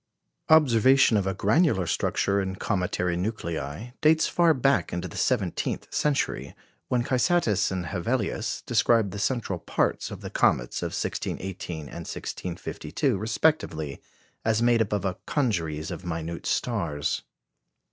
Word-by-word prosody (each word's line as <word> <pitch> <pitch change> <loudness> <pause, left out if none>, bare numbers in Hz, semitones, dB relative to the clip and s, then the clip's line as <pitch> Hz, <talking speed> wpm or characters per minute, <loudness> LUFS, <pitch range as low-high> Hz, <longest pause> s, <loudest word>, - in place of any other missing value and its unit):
Observation 130 -5 +5
of 100 -2 +1
a 95 - 0
granular 105 - +3
structure 100 +4 +1
in 95 -1 -3
cometary 90 -2 -1
nuclei 90 0 -4
dates 160 0 +5
far 170 -1 +4
back 135 - +2
into 85 +1 -3
the 85 - -11
seventeenth 105 -9 -1
century, 150 -2 0 0.3
when 125 -1 +1
Cysatus 130 - +2
and 90 -2 -2
Hevelius 110 +5 -2
described 115 -3 +3
the 100 - -6
central 105 -4 -1
parts - - -1
of - - -8
the - - -7
comets - - +1
of - - -1
1618 90 -4 -4
and 75 - -10 0.2
1652 90 -1 -3
respectively 100 - 0 0.4
as 110 -1 +2
made 120 -1 +4
up 110 - 0
of 100 -2 -1
a 95 -1 -2
congeries 80 - -1
of - - -6
minute 85 -1 -4
stars. 85 - -1
100 Hz, 135 wpm, -26 LUFS, 90-120 Hz, 0.4 s, Observation